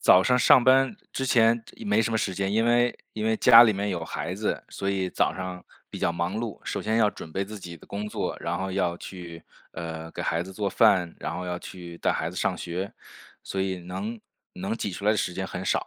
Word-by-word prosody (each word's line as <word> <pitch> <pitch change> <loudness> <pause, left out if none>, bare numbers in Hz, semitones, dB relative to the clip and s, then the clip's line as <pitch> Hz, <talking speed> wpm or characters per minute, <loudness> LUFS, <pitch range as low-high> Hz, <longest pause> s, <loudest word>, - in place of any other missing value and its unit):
早 90 - +7
上 125 +3 +3
上 125 +1 +7
班 135 - +4 0.2
之 135 - -1
前 115 -2 +3 0.2
没 105 +2 +3
什 115 - -1
么 110 - +1
时 95 -3 -1
间， 95 +1 -1
因 110 +2 +3
为 120 +1 +3 0.2
因 110 - -3
为 110 0 +2
家 120 -2 +9
里 115 -2 +5
面 100 +1 -2
有 85 -4 -2
孩 - - -4
子， - - -2
所 100 - -3
以 95 -1 -1
早 - - +1
上 90 -1 -6 0.2
比 - - -7
较 85 - +1
忙 85 +3 -2
碌， 115 -2 -4
首 - - -3
先 110 +1 +1
要 110 -2 +5
准 80 -5 -9
备 95 - -1
自 105 +2 -7
己 90 -3 -8
的 85 - -15
工 100 +1 -4
作， 105 - -3
然 - - -2
后 95 +1 -3
要 90 -2 0
去， 85 -3 -9 0.3
呃， 80 -1 -6
给 - - -6
孩 80 +2 0
子 95 - -9
做 100 +1 -1
饭， 95 -5 +3
然 - - -4
后 90 - -4
要 90 0 -3
去 85 -2 -9
带 - - +1
孩 80 - -2
子 90 - -9
上 90 - +1
学。 90 +3 -4 0.5
所 95 - -3
以 95 -1 -2
能 205 - -5 0.3
能 195 +4 -3
挤 105 - -3
出 100 +2 -5
来 - - +6
的 110 - +2
时 90 - -1
间 95 +1 -3
很 95 0 -5
少， - - 0
95 Hz, 265 characters per minute, -26 LUFS, 90-110 Hz, 0.5 s, 家